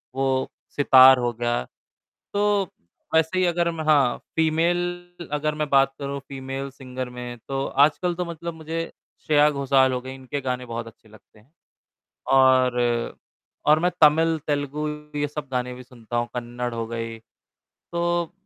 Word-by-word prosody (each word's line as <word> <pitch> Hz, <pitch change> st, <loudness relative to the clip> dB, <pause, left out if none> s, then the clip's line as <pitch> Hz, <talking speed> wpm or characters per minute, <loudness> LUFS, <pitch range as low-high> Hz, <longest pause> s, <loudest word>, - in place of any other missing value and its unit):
वो 135 Hz, -1 st, 0 dB, 0.3 s
सितार 130 Hz, -2 st, +8 dB
हो 120 Hz, -1 st, 0 dB
गया। 120 Hz, -, -1 dB, 0.7 s
तो, 205 Hz, 0 st, +2 dB, 0.5 s
वैसे 160 Hz, +3 st, +2 dB
ही 185 Hz, -, +3 dB
अगर 170 Hz, -1 st, +1 dB
मैं 160 Hz, -1 st, -5 dB
हाँ 140 Hz, -5 st, +4 dB, 0.2 s
फीमेल 175 Hz, +2 st, 0 dB
अगर 150 Hz, +1 st, -1 dB
मैं 150 Hz, -1 st, -2 dB
बात 135 Hz, -1 st, +4 dB
करूँ 140 Hz, 0 st, -4 dB
फीमेल 135 Hz, 0 st, -5 dB
सिंगर 130 Hz, -2 st, -7 dB
में, 125 Hz, 0 st, -7 dB
तो 135 Hz, 0 st, -2 dB, 0.2 s
आजकल 175 Hz, +4 st, -1 dB
तो 180 Hz, +1 st, -2 dB
मतलब 170 Hz, 0 st, -6 dB
मुझे 160 Hz, +1 st, -5 dB, 0.4 s
श्रेया 150 Hz, -1 st, +5 dB
घोषाल 135 Hz, -2 st, +2 dB
हो 125 Hz, -, -2 dB
गई, 130 Hz, +1 st, -8 dB
इनके 135 Hz, +2 st, -5 dB
गाने 125 Hz, -1 st, -3 dB
बहुत 115 Hz, -1 st, -5 dB
अच्छे 110 Hz, 0 st, -16 dB
लगते 110 Hz, 0 st, -20 dB
हैं। 115 Hz, +7 st, -26 dB, 0.8 s
और 130 Hz, -2 st, +5 dB, 0.9 s
और 155 Hz, +1 st, +6 dB
मैं 180 Hz, +2 st, +1 dB
तमिल, 160 Hz, +2 st, +5 dB
तेलुगु 145 Hz, +1 st, -1 dB, 0.3 s
ये 145 Hz, -, 0 dB
सब 150 Hz, 0 st, -6 dB
गाने 125 Hz, -1 st, -2 dB
भी 125 Hz, 0 st, -10 dB
सुनता 120 Hz, -1 st, -7 dB
हूँ, 120 Hz, 0 st, 0 dB
कन्नड़ 120 Hz, 0 st, -4 dB
हो 115 Hz, -1 st, -3 dB
गई, 115 Hz, 0 st, -5 dB, 0.5 s
तो 170 Hz, 0 st, -2 dB
140 Hz, 155 wpm, -24 LUFS, 125-160 Hz, 0.9 s, सितार